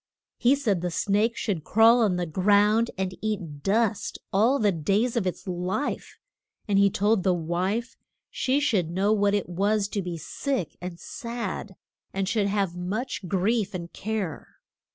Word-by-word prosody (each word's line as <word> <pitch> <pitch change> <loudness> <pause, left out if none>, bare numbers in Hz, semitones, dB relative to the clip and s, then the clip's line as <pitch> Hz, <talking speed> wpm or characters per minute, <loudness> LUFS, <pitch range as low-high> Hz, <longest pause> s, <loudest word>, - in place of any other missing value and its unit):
He 255 +3 +5
said 215 -11 0
the 180 - -1
snake 210 +6 +1
should 185 -8 -2
crawl 225 +6 +5
on 205 -5 +3
the 180 0 -1
ground 205 +6 +3
and 185 -1 -2
eat 185 -9 -3
dust 215 +4 0 0.2
all 225 +8 +4
the 210 -5 +3
days 200 +9 0
of 215 -5 +1
its 180 - -4
life; 185 +9 -3 0.5
and 200 -1 +3
he 200 0 +5
told 205 +2 +2
the 185 -1 +2
wife 185 +8 -2 0.4
she 265 +2 +1
should 205 - +1
know 195 +5 +2
what 205 -1 +2
it 205 - -1
was 200 +4 +1
to 205 - -2
be 175 -2 -4
sick 245 - -3
and 180 -1 -6
sad, 230 -5 -5 0.4
and 195 0 0
should 205 +1 +1
have 195 -3 0
much 195 +4 -3
grief 200 +3 0
and 170 -1 -6
care. 210 -7 -4
200 Hz, 165 wpm, -26 LUFS, 180-220 Hz, 0.5 s, He